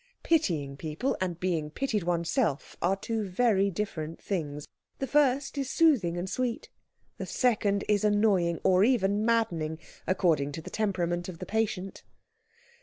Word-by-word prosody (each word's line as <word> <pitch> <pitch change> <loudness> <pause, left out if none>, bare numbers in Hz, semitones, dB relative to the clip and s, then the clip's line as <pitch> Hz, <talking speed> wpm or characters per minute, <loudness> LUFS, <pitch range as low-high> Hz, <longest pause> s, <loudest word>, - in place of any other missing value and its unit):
Pitying 160 - +1
people 160 - -2
and 175 -2 -2
being 170 -5 -1
pitied 220 - -1
oneself 170 - -1
are 185 +3 +2
two 220 +2 -3
very 200 -1 +2
different 165 -5 -4
things. 150 -7 -4 0.3
The 270 - -2
first 280 0 +2
is 270 -2 -2
soothing 255 - +3
and 175 +2 -3
sweet, 240 +3 -3 0.5
the - - -4
second 210 -5 +1
is 210 -1 +2
annoying, 205 -5 +2
or 185 0 +4
even 210 -4 +2
maddening, 180 -9 0 0.3
according 160 -7 +1
to 160 - -5
the - - -9
temperament 175 -4 -1
of 175 - -8
the - - -6
patient. 210 -3 -2
195 Hz, 145 wpm, -28 LUFS, 170-225 Hz, 0.5 s, or